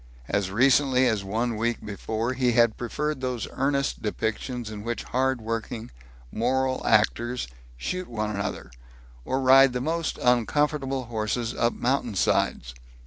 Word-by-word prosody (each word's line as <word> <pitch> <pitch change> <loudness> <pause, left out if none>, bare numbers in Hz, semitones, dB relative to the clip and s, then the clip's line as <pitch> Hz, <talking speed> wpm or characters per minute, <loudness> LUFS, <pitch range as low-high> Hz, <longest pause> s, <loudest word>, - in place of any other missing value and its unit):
As 100 -2 0
recently 130 +4 +4
as 110 -5 +1
one 115 +4 -1
week 115 +1 -2
before 110 +3 -3
he 125 -2 +1
had 115 -1 +4
preferred 150 +4 -3
those 125 -3 -2
earnest 140 +1 0
depictions 110 +2 -3
in 105 -1 -7
which 120 +1 -3
hard 130 0 0
working, 115 0 -4 0.4
moral 130 +3 0
actors 120 - +2 0.3
shoot 185 - -3
one 110 -2 -3
another, 100 - -4 0.5
or 130 - 0
ride 135 0 +6
the 125 - -1
most 165 +4 -2
uncomfortable 135 +2 +1
horses 115 0 -2
up 115 - +1
mountainsides. 115 - 0
120 Hz, 135 wpm, -26 LUFS, 110-130 Hz, 0.5 s, ride